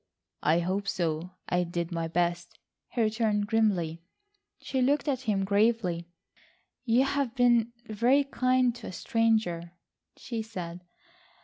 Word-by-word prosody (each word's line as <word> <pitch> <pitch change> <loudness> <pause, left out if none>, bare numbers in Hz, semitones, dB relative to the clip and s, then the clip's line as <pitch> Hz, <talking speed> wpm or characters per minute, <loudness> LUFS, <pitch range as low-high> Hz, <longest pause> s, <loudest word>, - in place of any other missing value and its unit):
"I 160 +3 +3
hope 190 +3 -2
so, 170 -2 -1 0.2
I 180 0 +1
did 170 0 -3
my 165 -1 -2
best," 175 +1 -1 0.3
he 240 - -1
returned 215 -1 +1
grimly. 195 -7 +1 0.6
She 265 - -2
looked 285 +4 +2
at 265 -3 0
him 195 -2 +1
gravely. 200 -4 +1 0.8
"You 240 +2 +4
have 275 -3 -1
been 240 -2 +4
very 235 +6 +3
kind 255 -2 +2
to - - -9
a - - -5
stranger," 200 -5 0 0.4
she 230 -3 -4
said. 180 -5 -7
210 Hz, 130 wpm, -28 LUFS, 175-235 Hz, 0.8 s, You